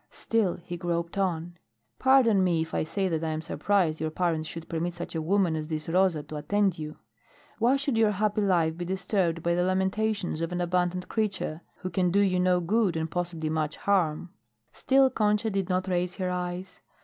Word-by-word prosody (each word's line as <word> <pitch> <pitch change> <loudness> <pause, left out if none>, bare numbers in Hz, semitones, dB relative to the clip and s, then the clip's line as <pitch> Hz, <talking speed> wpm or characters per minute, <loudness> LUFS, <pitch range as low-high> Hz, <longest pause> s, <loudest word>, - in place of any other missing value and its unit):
Still 220 -6 0
he 175 0 -6
groped 170 -1 -2
on. 175 -3 -2 0.4
"Pardon 250 -7 +5
me 170 -3 +2
if 160 - -11
I - - +1
say 190 +5 -1
that 165 -3 -1
I 160 - -1
am 155 0 -2
surprised 170 -3 0
your 160 - 0
parents 160 -1 -1
should 165 -1 -7
permit 170 +1 -2
such 175 - -6
a 165 - -2
woman 180 0 +2
as 155 -1 -4
this 155 -1 -4
Rosa 175 -3 +2
to 150 +1 -7
attend 195 +3 +1
you. 155 0 -6 0.6
Why 240 +4 +4
should 275 -4 0
your 220 -1 +5
happy 210 +1 0
life 170 -5 +2
be 175 - -5
disturbed 180 -2 -1
by 170 - +2
the 175 - +1
lamentations 190 -1 0
of 165 +1 -2
an 180 - -2
abandoned 180 +1 0
creature 195 -7 -2 0.2
who 185 - -4
can 180 +1 +1
do 200 +3 +3
you 185 -2 +2
no 180 0 +3
good, 195 -1 +1
and 160 0 -3
possibly 170 -3 -2
much 155 -1 -1
harm?" 175 -3 0 0.4
Still 265 0 +3
Concha 210 +1 +1
did 195 -1 -1
not 185 +1 0
raise 180 -1 -1
her 185 -2 -2
eyes. 180 +1 -5
180 Hz, 200 wpm, -27 LUFS, 165-195 Hz, 0.6 s, Pardon